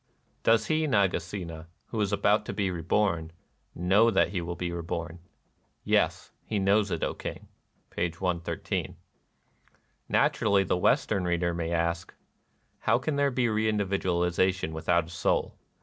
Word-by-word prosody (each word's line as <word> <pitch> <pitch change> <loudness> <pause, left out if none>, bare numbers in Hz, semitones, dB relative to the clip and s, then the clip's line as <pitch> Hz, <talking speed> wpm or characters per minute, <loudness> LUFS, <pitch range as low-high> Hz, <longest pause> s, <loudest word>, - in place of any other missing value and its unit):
" - - -41
Does 110 -1 +4
he, 155 +4 +1
Nagasena, 90 - -1 0.2
who 110 - -2
is 100 -1 0
about 105 +1 +2
to - - -3
be 100 -3 0
reborn, 85 -1 0 0.4
know 100 +6 +4
that 95 -5 +3
he 90 -1 -2
will 85 +1 -4
be 90 -1 -3
reborn? 85 0 -4 0.2
" - - -43
" - - -44
Yes: - - +1
he 110 - -3
knows 100 +1 +3
it, - - -2
O - - 0
King." - - -7 0.4
(p. 85 - -1
113.) 85 0 -3 1.1
Naturally 100 -2 +3
the 90 - 0
Western 90 +2 +2
reader 85 0 0
may 85 0 -3
ask, 85 +1 -1 0.3
— - - -43
"How 115 - +5
can 140 +4 -2
there 140 0 +2
be 125 -1 0
reindividualization 95 -5 +1
with 80 0 -7
out 85 -2 +4
a - - -13
soul 85 - 0
90 Hz, 160 wpm, -28 LUFS, 85-105 Hz, 1.1 s, How